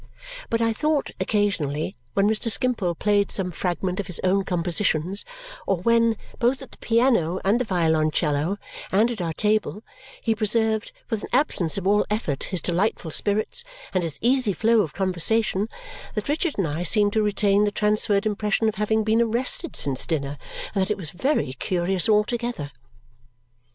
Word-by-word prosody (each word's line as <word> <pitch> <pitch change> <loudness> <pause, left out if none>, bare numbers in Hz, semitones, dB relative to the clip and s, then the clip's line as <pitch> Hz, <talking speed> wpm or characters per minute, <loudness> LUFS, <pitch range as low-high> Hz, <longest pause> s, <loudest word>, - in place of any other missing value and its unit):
But 230 0 0
I 230 0 +2
thought, 300 +4 0
occasionally, 175 -9 -1 0.2
when 200 +1 +3
Mr. 220 +2 +1
Skimpole 225 -8 +1
played 205 +2 +1
some 185 -2 -2
fragments 180 +2 -2
of 200 - -3
his 180 - -2
own 190 +1 +2
compositions 175 +1 +1 0.4
or 195 - +2
when, 230 +1 +3 0.2
both 255 +3 +1
at 265 - -13
the - - -16
piano 230 -8 +2
and 210 +5 +3
the 250 - 0
violoncello, 160 -1 +1 0.3
and 220 +5 +3
at 220 -5 -4
our 165 -2 -2
table, 215 +2 0 0.4
he 225 - 0
preserved 220 0 +1 0.2
with 220 -2 -1
an - - -7
absence 215 - +1
of - - -4
all 205 +2 +4
effort 210 -10 -2
his 185 -3 -1
delightful 175 -2 -1
spirits 215 - 0 0.3
and 185 - +2
his 165 -4 -3
easy 250 -3 +2
flow 225 +3 +3
of 160 -7 -4
conversation, 195 +3 +1 0.5
that 210 - -3
Richard 310 +2 0
and 195 - +1
I 155 +3 -3
seemed 205 +3 +2
to 220 - +2
retain 205 0 +2
the 205 - 0
transferred 210 0 +1
impression 215 +1 0
of 220 - 0
having 220 +1 +2
been 220 +2 +2
arrested 240 +8 0
since 135 -2 -2
dinner 145 -3 -2 0.3
and 200 - +1
that 190 - 0
it 210 - 0
was 165 -6 -6
very 190 - 0
curious 180 +6 +1
altogether. 215 -6 0
205 Hz, 170 wpm, -24 LUFS, 180-225 Hz, 0.5 s, all